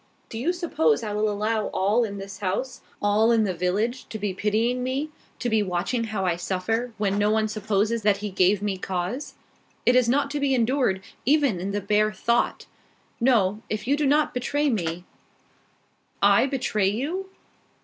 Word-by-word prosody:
"Do 225 Hz, -, -6 dB
you 305 Hz, +9 st, +1 dB
suppose 230 Hz, -, +1 dB
I 210 Hz, -2 st, -3 dB
will 210 Hz, +1 st, +1 dB
allow 215 Hz, +1 st, -1 dB
all 210 Hz, +5 st, +1 dB
in 200 Hz, -3 st, -4 dB
this 195 Hz, 0 st, -8 dB
house, 210 Hz, +6 st, -3 dB, 0.2 s
all 210 Hz, +3 st, +3 dB
in 225 Hz, -2 st, +4 dB
the 195 Hz, -3 st, 0 dB
village, 205 Hz, +8 st, -1 dB
to 220 Hz, -, -5 dB
be 205 Hz, -2 st, -2 dB
pitying 220 Hz, +6 st, 0 dB
me, 270 Hz, +4 st, -2 dB, 0.3 s
to -, -, -3 dB
be 220 Hz, -2 st, +2 dB
watching 195 Hz, +5 st, -1 dB
how 210 Hz, -3 st, -2 dB
I 175 Hz, -2 st, +1 dB
suffer, 225 Hz, +7 st, -2 dB
when 200 Hz, -1 st, 0 dB
no 205 Hz, 0 st, +3 dB
one 220 Hz, 0 st, +2 dB
supposes 215 Hz, +1 st, 0 dB
that 205 Hz, -1 st, +3 dB
he 205 Hz, 0 st, -5 dB
gave 190 Hz, +2 st, +2 dB
me 195 Hz, -2 st, -2 dB
cause? 185 Hz, +9 st, -4 dB, 0.5 s
It 245 Hz, -, +5 dB
is 250 Hz, -2 st, +4 dB
not 280 Hz, +2 st, +1 dB
to 295 Hz, -, -2 dB
be 280 Hz, -2 st, +2 dB
endured, 235 Hz, -5 st, +1 dB, 0.2 s
even 280 Hz, -, +2 dB
in 190 Hz, +3 st, -3 dB
the 205 Hz, +1 st, -2 dB
bare 210 Hz, +2 st, +2 dB
thought. 235 Hz, +4 st, 0 dB, 0.5 s
No. 220 Hz, -5 st, +2 dB
If 215 Hz, 0 st, -3 dB
you 275 Hz, +3 st, +2 dB
do 295 Hz, -1 st, 0 dB
not 295 Hz, +2 st, +2 dB
betray 285 Hz, +4 st, 0 dB
me 175 Hz, -5 st, -2 dB, 0.6 s
" -, -, -40 dB, 0.2 s
"I -, -, +3 dB
betray 215 Hz, -7 st, 0 dB
you?" 320 Hz, -, -3 dB
215 Hz, 185 wpm, -25 LUFS, 195-250 Hz, 0.6 s, It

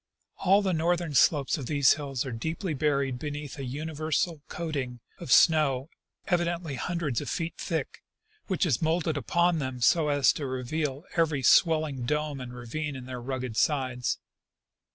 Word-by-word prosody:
All 195 Hz, +2 st, +4 dB
the 190 Hz, -2 st, +1 dB
northern 170 Hz, -1 st, 0 dB
slopes 145 Hz, +1 st, +3 dB
of 130 Hz, -, -6 dB
these 140 Hz, -3 st, +5 dB
hills 140 Hz, -4 st, -3 dB
are 130 Hz, -, -4 dB
deeply 160 Hz, -, -3 dB
buried 140 Hz, -3 st, 0 dB
beneath 145 Hz, -1 st, -6 dB
a 135 Hz, -, -4 dB
universal 155 Hz, +3 st, -2 dB
covering 140 Hz, -7 st, -4 dB, 0.2 s
of -, -, -6 dB
snow 150 Hz, -4 st, +4 dB, 0.4 s
evideiitly 175 Hz, -4 st, 0 dB
hundreds 170 Hz, -8 st, -2 dB
of -, -, -5 dB
feet 165 Hz, 0 st, -2 dB
thick, -, -, -3 dB, 0.5 s
which 190 Hz, -1 st, +1 dB
is 140 Hz, -10 st, +1 dB
molded 160 Hz, 0 st, +1 dB
upon 170 Hz, +3 st, +1 dB
them 130 Hz, -3 st, -4 dB
so 155 Hz, +6 st, +4 dB
as 145 Hz, -1 st, +4 dB
to 145 Hz, -, -4 dB
reveal 135 Hz, +4 st, -3 dB
every 155 Hz, -5 st, +2 dB
swelling 155 Hz, -5 st, +3 dB
dome 150 Hz, -1 st, -1 dB
and 125 Hz, -1 st, -7 dB
ravine 140 Hz, +5 st, -4 dB
in 130 Hz, -1 st, -7 dB
their 125 Hz, -1 st, -6 dB
rugged 125 Hz, -2 st, -4 dB
sides. 130 Hz, -3 st, 0 dB
150 Hz, 155 wpm, -28 LUFS, 130-160 Hz, 0.5 s, these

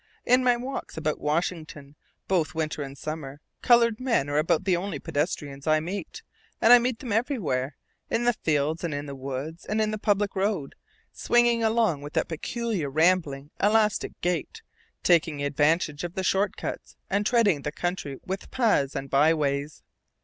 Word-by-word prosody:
In 250 Hz, +1 st, +4 dB
my 245 Hz, -1 st, +4 dB
walks 255 Hz, -5 st, -6 dB
about 155 Hz, -1 st, -1 dB
Washington, 155 Hz, -2 st, -3 dB, 0.3 s
both 180 Hz, -3 st, 0 dB
winter 155 Hz, -1 st, -2 dB
and 140 Hz, 0 st, -7 dB
summer, 145 Hz, -2 st, -6 dB, 0.2 s
colored 235 Hz, -2 st, +4 dB
men 235 Hz, -, +1 dB
are 145 Hz, -, +2 dB
about 155 Hz, 0 st, +1 dB
the 185 Hz, -2 st, +2 dB
only 180 Hz, -2 st, -3 dB
pedestrians 145 Hz, -1 st, -3 dB
I 155 Hz, 0 st, +4 dB
meet; 180 Hz, +3 st, -6 dB, 0.4 s
and 230 Hz, -, +7 dB
I 245 Hz, -, +9 dB
meet 245 Hz, 0 st, -1 dB
them 245 Hz, -3 st, -7 dB
everywhere, 170 Hz, -, -1 dB, 0.3 s
in 230 Hz, -, 0 dB
the 240 Hz, 0 st, +3 dB
fields 155 Hz, -3 st, -1 dB
and 165 Hz, -4 st, -2 dB
in 145 Hz, 0 st, -4 dB
the 140 Hz, -, -7 dB
woods 140 Hz, +5 st, -6 dB
and 215 Hz, -, -2 dB
in 215 Hz, 0 st, +1 dB
the 215 Hz, -, -4 dB
public 205 Hz, -1 st, +1 dB
road, 190 Hz, -7 st, -1 dB, 0.4 s
swinging 240 Hz, -1 st, +3 dB
along 220 Hz, -9 st, +2 dB
with 145 Hz, +1 st, -8 dB
that -, -, 0 dB
peculiar, 195 Hz, -, -3 dB
rambling, 155 Hz, -2 st, +1 dB
elastic 210 Hz, 0 st, +2 dB
gait, 175 Hz, -3 st, -2 dB, 0.4 s
taking 160 Hz, -4 st, +2 dB
advantage 150 Hz, +2 st, +1 dB
of 175 Hz, 0 st, -5 dB
the 190 Hz, -, -2 dB
short 195 Hz, +2 st, +1 dB
cuts -, -, -6 dB
and 205 Hz, +2 st, 0 dB
threading 210 Hz, -, +3 dB
the 150 Hz, -, -3 dB
country 175 Hz, -5 st, -3 dB
with 190 Hz, +1 st, -5 dB
paths 210 Hz, -, +1 dB
and 135 Hz, -, -3 dB
byways. 145 Hz, 0 st, +1 dB
170 Hz, 170 wpm, -26 LUFS, 145-215 Hz, 0.4 s, I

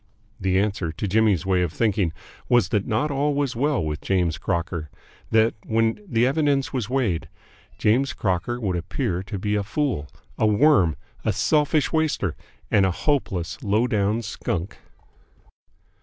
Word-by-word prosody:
The 95 Hz, -1 st, +1 dB
answer, 100 Hz, -4 st, 0 dB
to 85 Hz, +6 st, -4 dB
Jimmy's 100 Hz, -4 st, +2 dB
way 95 Hz, -1 st, +2 dB
of 90 Hz, -3 st, 0 dB
thinking, 100 Hz, -3 st, +1 dB, 0.4 s
was 120 Hz, -1 st, +4 dB
that 105 Hz, 0 st, -1 dB
all 145 Hz, +4 st, +1 dB
was 140 Hz, -4 st, -1 dB
not 120 Hz, -, -4 dB
well 145 Hz, -, +2 dB
with 75 Hz, 0 st, -3 dB
James 90 Hz, -3 st, 0 dB
Crocker, 85 Hz, -3 st, -2 dB, 0.4 s
that, 110 Hz, 0 st, +4 dB
when 115 Hz, -, +1 dB
all 210 Hz, -, -20 dB
the 120 Hz, -6 st, +2 dB
evidence 140 Hz, 0 st, +1 dB
was 120 Hz, -5 st, -2 dB
weighed, 100 Hz, -, 0 dB, 0.5 s
James 130 Hz, +6 st, +2 dB
Crocker 100 Hz, +5 st, -1 dB
would 95 Hz, -6 st, -1 dB
appear 85 Hz, +1 st, -2 dB
to 100 Hz, +2 st, -6 dB
be 105 Hz, +2 st, -1 dB
a 105 Hz, -, +1 dB
fool, 105 Hz, -, -1 dB, 0.3 s
a 110 Hz, -, +4 dB
worm, 105 Hz, -, +4 dB, 0.3 s
a 110 Hz, -, +1 dB
selfish 150 Hz, -, +1 dB
waster, 155 Hz, -, 0 dB, 0.4 s
and 100 Hz, -, +5 dB
a 95 Hz, -, +3 dB
hopeless, 90 Hz, -, -1 dB
low 105 Hz, +3 st, +2 dB
down 105 Hz, 0 st, 0 dB
skunk. 95 Hz, -3 st, -4 dB
105 Hz, 155 wpm, -24 LUFS, 90-130 Hz, 0.5 s, and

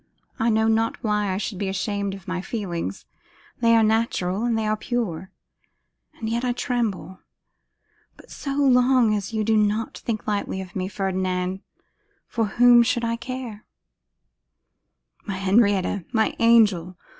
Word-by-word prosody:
I 230 Hz, -, +2 dB
know 220 Hz, 0 st, +2 dB
not 225 Hz, 0 st, 0 dB
why 210 Hz, -2 st, 0 dB
I 185 Hz, -, -1 dB
should 200 Hz, -1 st, -4 dB
be 200 Hz, -, -2 dB
ashamed 200 Hz, +1 st, -2 dB
of 195 Hz, 0 st, -14 dB
my 185 Hz, 0 st, -2 dB
feelings. 175 Hz, -, -4 dB, 0.5 s
They 230 Hz, -1 st, +4 dB
are 225 Hz, -, +5 dB
natural, 215 Hz, -2 st, 0 dB
and 235 Hz, -2 st, +1 dB
they 220 Hz, -, -1 dB
are 215 Hz, 0 st, +1 dB
pure. 210 Hz, -6 st, -3 dB, 0.9 s
And 220 Hz, -, -6 dB
yet 235 Hz, +2 st, -1 dB
I 250 Hz, -1 st, +1 dB
tremble. 230 Hz, -7 st, -3 dB, 1.0 s
But -, -, -17 dB
so 275 Hz, -1 st, -5 dB
long 255 Hz, -4 st, +4 dB
as 205 Hz, 0 st, -3 dB
you 220 Hz, -1 st, -1 dB
do 220 Hz, +1 st, +2 dB
not 210 Hz, +1 st, 0 dB
think 220 Hz, -3 st, -4 dB
lightly 205 Hz, -2 st, -2 dB
of 185 Hz, -1 st, -9 dB
me, 185 Hz, -1 st, -2 dB
Ferdinand, 185 Hz, -1 st, -2 dB, 0.7 s
for 225 Hz, -2 st, -1 dB
whom 240 Hz, +3 st, +6 dB
should 240 Hz, 0 st, +1 dB
I 230 Hz, 0 st, 0 dB
care?' 240 Hz, -3 st, -7 dB, 1.6 s
'My 195 Hz, -, -3 dB
Henrietta! 195 Hz, -1 st, +2 dB
my 220 Hz, -2 st, +1 dB
angel! 205 Hz, -7 st, +4 dB
215 Hz, 150 wpm, -23 LUFS, 190-230 Hz, 1.6 s, whom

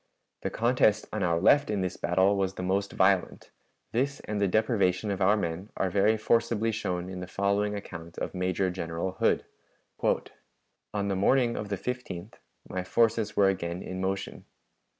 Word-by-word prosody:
The -, -, -2 dB
contest 115 Hz, -3 st, +2 dB
on 110 Hz, -, -2 dB
our 85 Hz, -2 st, +2 dB
left 145 Hz, +10 st, +4 dB
in 105 Hz, -2 st, 0 dB
this 90 Hz, -1 st, -2 dB
battle 95 Hz, +3 st, +2 dB
was 95 Hz, -1 st, -1 dB
the 90 Hz, -, -5 dB
most 100 Hz, +2 st, 0 dB
violent. 95 Hz, -1 st, +1 dB, 0.4 s
This 135 Hz, +4 st, 0 dB
and 105 Hz, -1 st, -3 dB
the 100 Hz, -, +3 dB
deprivation 105 Hz, -1 st, +1 dB
of 100 Hz, 0 st, -3 dB
our 100 Hz, +3 st, +4 dB
men 90 Hz, +1 st, -3 dB
are 95 Hz, -, 0 dB
very 105 Hz, +4 st, +3 dB
forcibly 115 Hz, 0 st, +1 dB
shown 90 Hz, -5 st, -3 dB
in 95 Hz, -1 st, -6 dB
the 90 Hz, -, -6 dB
following 100 Hz, +2 st, 0 dB
account 85 Hz, -4 st, -8 dB
of -, -, -4 dB
Major 90 Hz, 0 st, 0 dB
General 85 Hz, 0 st, -3 dB
Hood: -, -, +2 dB, 1.5 s
"On 100 Hz, -1 st, -1 dB
the 100 Hz, -, 0 dB
morning 120 Hz, +5 st, +3 dB
of 105 Hz, -, -4 dB
the 100 Hz, -, -1 dB
15th 110 Hz, -5 st, -5 dB, 0.3 s
my 95 Hz, -1 st, -3 dB
forces 110 Hz, +2 st, +1 dB
were 100 Hz, -, +6 dB
again 90 Hz, -2 st, -3 dB
in 95 Hz, 0 st, -5 dB
motion. 95 Hz, +1 st, -3 dB
100 Hz, 170 wpm, -28 LUFS, 90-110 Hz, 1.5 s, were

